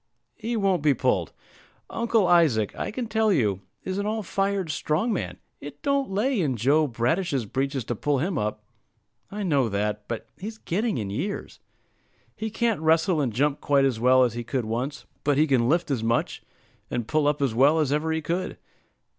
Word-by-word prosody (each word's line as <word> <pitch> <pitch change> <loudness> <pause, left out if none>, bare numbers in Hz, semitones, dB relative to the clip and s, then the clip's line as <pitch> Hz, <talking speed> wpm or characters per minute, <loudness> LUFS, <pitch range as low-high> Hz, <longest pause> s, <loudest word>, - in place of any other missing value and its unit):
"He 230 +1 -3
won't 195 -5 +2
be 145 -2 +3
pulled. - - 0 0.6
Uncle 230 -3 +1
Isaac, 150 - +3
I - - -3
can 245 +2 -4
tell 220 -1 +1
you, 105 - +1 0.2
is 190 +1 -3
an 200 - -1
all 220 0 -1
fired 195 -1 -1
strong 160 +10 0
man; 195 - -3 0.2
it 145 0 -10
don't 280 -3 +1
lay 210 +4 +1
in 140 -6 0
Joe 145 +7 +3
Bradish's 130 - 0
breeches 135 +3 -2
to 120 - -2
pull 145 +5 0
him 175 +7 -1
up." 105 -4 -2 0.7
"I 205 +1 -4
know 140 - +2
that; 105 +1 -2
but 115 -2 -4
he's 220 +4 -6
getting 215 +3 -1
in 100 -3 -3
years." 180 - -4 0.8
"He 220 - -4
can't 225 -4 0
wrestle 160 +1 +3
and 130 -4 0
jump 145 +5 0
quite 140 -1 +3
as 125 -5 0
well 130 +2 +5
as 120 -3 +1
he 120 0 -4
could 125 0 -2
once; 125 +4 -3 0.2
but 145 -1 +2
he 155 - +5
can 125 -5 +2
lift 165 -1 +1
as 120 -5 -1
much, 115 +1 0 0.5
and 120 -2 -3
pull 155 +1 +2
up 150 0 +1
as 135 -5 +1
well, 140 +7 +4
as 150 -3 +1
ever 155 +2 0
he 160 -1 -1
could. 175 +4 -2
150 Hz, 195 wpm, -25 LUFS, 125-195 Hz, 0.8 s, well